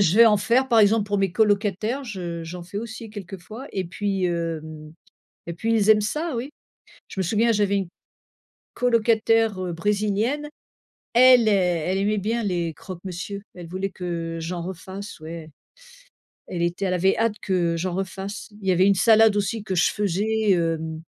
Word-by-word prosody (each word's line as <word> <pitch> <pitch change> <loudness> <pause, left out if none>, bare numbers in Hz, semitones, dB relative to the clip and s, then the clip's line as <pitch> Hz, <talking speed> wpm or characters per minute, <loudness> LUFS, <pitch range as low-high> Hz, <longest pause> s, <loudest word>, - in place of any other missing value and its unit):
je 185 -3 +3
vais 230 - +9
en 210 -2 +5
faire 250 +5 +2
par 235 -3 +4
exemple 215 0 +4
pour 205 -1 -1
mes 195 -2 0
colocataires. 210 +4 +1
Je, 215 -6 -6
heu, 170 -1 -5
j'en 175 +2 -7
fais 180 +4 -6
aussi 225 0 -7
quelques 195 -2 -8
fois 220 +9 -9
et 190 - -2
puis, 195 +2 -2
hem, 160 -3 -4 0.5
et 170 - -5
puis 225 +7 -1
ils 215 -2 +2
aiment 215 -1 +7
ça, 300 +9 -2
oui. 250 +5 -4 0.6
Je - - -7
me - - 0
souviens, 225 +5 +2
j'avais 205 -1 +2
une 195 -2 -2 0.9
colocataire, 225 -3 +2
heu, 180 -1 -3
brésilienne. 210 - 0 0.7
Elle 250 -1 +7
ai - - +4
elle 180 -1 +1
aimait 210 +2 +1
bien 225 +4 -1
les 175 -4 -1
croque-monsieur, 185 +3 -7
elle 175 -2 -10
voulait 190 +3 -3
que, 180 - -10 0.3
heu, - - -5
j'en 170 +1 -4
refasse, 190 +3 -8
ouais. 160 0 -8 1.0
Elle 175 -2 -3
était 175 +3 -1
elle 180 - 0
avait 190 +2 +2
hâte 225 -1 +1
que 175 -4 0
j'en 175 +1 -2
refasse. 195 +2 -5
Il 195 - -9
y - - +5
avait 185 +2 +4
une 200 - +4
salade 220 +1 +5
aussi 205 +2 -1
que 190 -3 -3
je 175 - +4
faisais, 210 +2 0
hem, 160 -2 -1
195 Hz, 185 wpm, -24 LUFS, 175-220 Hz, 1.0 s, vais